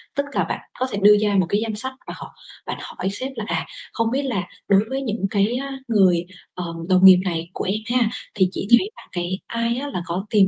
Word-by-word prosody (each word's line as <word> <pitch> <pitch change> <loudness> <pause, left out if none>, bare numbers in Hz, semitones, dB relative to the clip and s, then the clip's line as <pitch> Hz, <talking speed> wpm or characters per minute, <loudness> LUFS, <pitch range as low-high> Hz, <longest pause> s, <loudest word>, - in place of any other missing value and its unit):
tức 280 0 0
cà - - +1
bạn - - -3 0.2
có 255 - +1
thể 200 - -2
đưa 210 +1 +8
ra 205 -1 +2
một 180 - +3
cái 205 +2 +1
danh 220 -2 -2
sách 260 +5 -3
và - - -5
họ - - -10 0.3
bạn - - -4
hỏi 190 - -4
sếp 260 +6 -3
là 220 - -4
"À, - - -1 0.3
không 230 -1 0
biết 275 +2 0
là 225 -9 -1 0.2
đối 195 -1 +5
với 270 +1 -2
những 220 -5 -2
cái, 210 +4 +1
ờ, 275 +1 -4 0.2
người, 185 -6 +4 0.3
ờm, 170 -2 -5
đồng 185 +1 +5
nghiệp 185 -1 +10
này 170 -1 -2
của - - -3
em 195 +3 0 0.2
ha 225 -2 +2 0.3
thì 190 -3 +3
chị 195 - -4
thấy 310 - +5
là - - -13
cái 180 +2 -3
ai 230 +1 -1
á 285 +2 -3
là 180 - -2
có 180 +4 -3
tiềm 200 -3 +5
205 Hz, 250 wpm, -22 LUFS, 185-235 Hz, 0.3 s, nghiệp